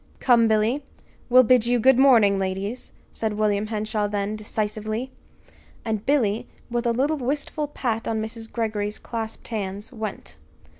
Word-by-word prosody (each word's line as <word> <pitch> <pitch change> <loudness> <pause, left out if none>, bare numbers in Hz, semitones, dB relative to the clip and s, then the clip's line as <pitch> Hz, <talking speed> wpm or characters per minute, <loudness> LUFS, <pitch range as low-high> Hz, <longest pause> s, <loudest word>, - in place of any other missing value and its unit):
"Come, 235 -3 +5
Billy! 220 +6 +1 0.5
We'll 255 +1 +7
bid 240 -1 +4
you 245 0 +3
good 260 +2 +5
morning, 225 -8 +6
ladies," 195 +5 -3 0.2
said 220 -1 -2
William 210 0 +1
Henshaw 215 -1 -1
then, 205 0 -2
decisively. 215 +3 -3 0.7
And 220 -1 -2
Billy, 230 -7 +1 0.2
with 240 0 0
a - - +3
little 280 +6 +1
wistful 290 +3 -2
pat 240 -5 -2
on 225 -1 0
Mrs. 225 +1 -5
Greggory's 215 -2 -2
clasped 225 -1 -6
hands, 205 +1 -4
went. 215 - -6
220 Hz, 145 wpm, -24 LUFS, 210-245 Hz, 0.7 s, We'll